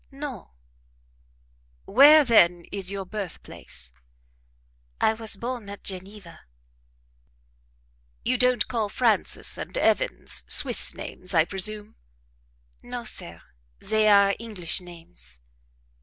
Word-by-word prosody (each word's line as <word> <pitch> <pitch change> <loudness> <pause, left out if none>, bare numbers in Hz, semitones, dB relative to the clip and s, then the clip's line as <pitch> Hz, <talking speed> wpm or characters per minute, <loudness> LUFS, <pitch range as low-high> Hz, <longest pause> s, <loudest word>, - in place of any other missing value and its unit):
"No." 275 -6 -8 1.4
"Where, 290 +6 +7
then, 175 -7 +4
is 195 -2 -2
your 195 -1 -4
birthplace?" 180 - -7 1.1
"I 220 - +3
was 220 -1 -3
born 235 -2 -5
at 200 - -10
Geneva." 190 -2 -8 1.9
"You 250 0 +1
don't 250 -3 +3
call 225 -4 -2
Frances 230 0 0
and - - -6
Evans - - +1
Swiss - - +4
names, 185 0 -4
I 160 -1 +5
presume?" 210 +3 -4 0.8
"No, - - -7
sir; - - -7 0.3
they 215 0 +1
are 200 -1 +5
English 200 -8 -4
names." 165 - -9
205 Hz, 100 wpm, -25 LUFS, 180-230 Hz, 1.9 s, Where